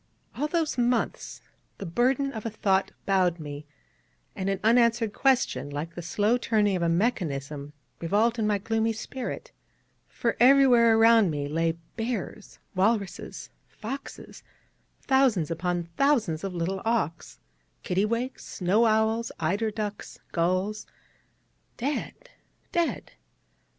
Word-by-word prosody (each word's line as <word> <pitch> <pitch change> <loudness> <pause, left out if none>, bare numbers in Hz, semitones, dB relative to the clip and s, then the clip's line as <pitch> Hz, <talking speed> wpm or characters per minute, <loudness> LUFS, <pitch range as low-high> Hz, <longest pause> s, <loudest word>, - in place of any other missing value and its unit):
All 285 +7 -1
those 315 -4 -1
months 240 -1 -1 0.3
the 200 - -6
burden 255 +9 +1
of 220 - -6
a 230 - -2
thought 195 -2 +1
bowed 185 -3 +2
me; 145 -1 -8 0.7
and 190 0 -2
an 195 - -1
unanswered 230 -1 +3
question, 265 - +1
like 150 +4 -5
the 175 - -6
slow 205 +7 +1
turning 210 -4 +2
of 180 - -2
a 170 - +2
mechanism, 150 - -1 0.3
revolved 220 +7 +1
in 215 - +1
my 210 -1 +2
gloomy 225 +2 0
spirit: 245 +3 -6 0.6
for 230 - -2
everywhere 245 -3 +6
around 225 -3 +6
me 145 -2 -2
lay 165 +2 0 0.2
bears, 225 -3 -4 0.2
walruses, 200 0 -1 0.2
foxes, 270 +6 -8 0.6
thousands 255 - +2
upon 175 +1 -1
thousands 225 - +2
of 195 -2 -4
little 185 +3 -2
awks, 220 -9 -2 0.5
kittiwakes, 230 +7 -1
snow 205 +6 +1
owls, 220 +1 +1
eider 200 +8 0
ducks, 210 -1 -5
gulls 185 +5 -1 0.9
dead, 300 - -4 0.4
dead. 335 -8 -1
215 Hz, 120 wpm, -27 LUFS, 180-235 Hz, 0.9 s, everywhere